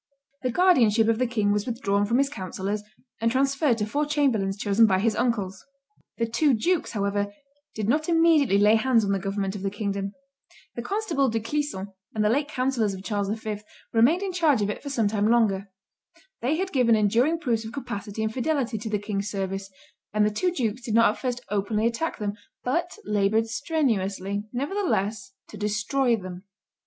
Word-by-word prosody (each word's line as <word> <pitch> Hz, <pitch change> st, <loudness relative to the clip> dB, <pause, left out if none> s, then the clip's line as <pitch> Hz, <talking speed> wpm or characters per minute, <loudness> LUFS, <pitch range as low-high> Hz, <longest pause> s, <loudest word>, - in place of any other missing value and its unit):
The 255 Hz, -, 0 dB
guardianship 235 Hz, -, +4 dB
of 225 Hz, 0 st, +2 dB
the 255 Hz, -, +2 dB
king 215 Hz, -4 st, +1 dB
was 210 Hz, +3 st, 0 dB
withdrawn 205 Hz, -4 st, 0 dB
from 235 Hz, +3 st, +2 dB
his 275 Hz, +1 st, +3 dB
councillors, 195 Hz, -4 st, -4 dB, 0.4 s
and 230 Hz, 0 st, +2 dB
transferred 275 Hz, 0 st, +2 dB
to 210 Hz, -, -1 dB
four 290 Hz, +7 st, -1 dB
chamberlains 240 Hz, -10 st, +1 dB
chosen 205 Hz, +2 st, +4 dB
by 190 Hz, -2 st, +3 dB
his 220 Hz, +3 st, +1 dB
uncles. 200 Hz, -6 st, -1 dB, 0.5 s
The 230 Hz, -, +1 dB
two 255 Hz, +4 st, +2 dB
dukes, 345 Hz, +10 st, 0 dB
however, 205 Hz, -1 st, -1 dB, 0.4 s
did 215 Hz, -2 st, -2 dB
not 305 Hz, +7 st, +1 dB
immediately 325 Hz, -, +4 dB
lay 210 Hz, +2 st, +5 dB
hands 230 Hz, -2 st, +3 dB
on 200 Hz, -, 0 dB
the 195 Hz, -, +1 dB
government 195 Hz, +1 st, -2 dB
of 200 Hz, -, -6 dB
the 195 Hz, -, -1 dB
kingdom; 200 Hz, -1 st, -3 dB, 0.6 s
the 235 Hz, -, -4 dB
constable 335 Hz, -, 0 dB
De 225 Hz, 0 st, 0 dB
Clisson 225 Hz, -6 st, -3 dB, 0.2 s
and 215 Hz, -1 st, +1 dB
the -, -, +4 dB
late 285 Hz, +5 st, +1 dB
councillors 255 Hz, -7 st, 0 dB
of 190 Hz, -, -9 dB
Charles 205 Hz, -2 st, -1 dB
V. 215 Hz, 0 st, -3 dB, 0.4 s
remained 270 Hz, -, +4 dB
in 385 Hz, -2 st, -3 dB
charge 305 Hz, -10 st, +3 dB
of 205 Hz, -, 0 dB
it -, -, -7 dB
for 285 Hz, -, -6 dB
some 230 Hz, -6 st, +1 dB
time 205 Hz, 0 st, +1 dB
longer; 205 Hz, -4 st, +2 dB, 0.7 s
they 265 Hz, +6 st, +1 dB
had 380 Hz, +3 st, -2 dB
given 245 Hz, -4 st, +4 dB
enduring 230 Hz, +10 st, +2 dB
proofs 235 Hz, -8 st, 0 dB
of 220 Hz, -, -7 dB
capacity 220 Hz, -5 st, -5 dB
and 220 Hz, 0 st, -1 dB
fidelity 255 Hz, -3 st, -1 dB
to 220 Hz, -, -5 dB
the 210 Hz, -, +1 dB
king's 205 Hz, 0 st, -3 dB
service; 195 Hz, -1 st, -3 dB, 0.4 s
and 210 Hz, 0 st, +3 dB
the 210 Hz, -, +1 dB
two 360 Hz, -, 0 dB
dukes 250 Hz, -7 st, -2 dB
did 235 Hz, -4 st, -2 dB
not 230 Hz, -2 st, +6 dB
at -, -, -9 dB
first 245 Hz, -2 st, -2 dB
openly 210 Hz, +2 st, 0 dB
attack 235 Hz, +8 st, -1 dB
them, 205 Hz, -1 st, -2 dB, 0.3 s
but 340 Hz, +9 st, -1 dB
labored 210 Hz, +2 st, +2 dB
strenuously, 210 Hz, -, -1 dB
nevertheless, 260 Hz, -, -1 dB
to -, -, -10 dB
destroy 220 Hz, +5 st, +1 dB
them. 185 Hz, -3 st, -8 dB
225 Hz, 190 wpm, -25 LUFS, 205-270 Hz, 0.7 s, not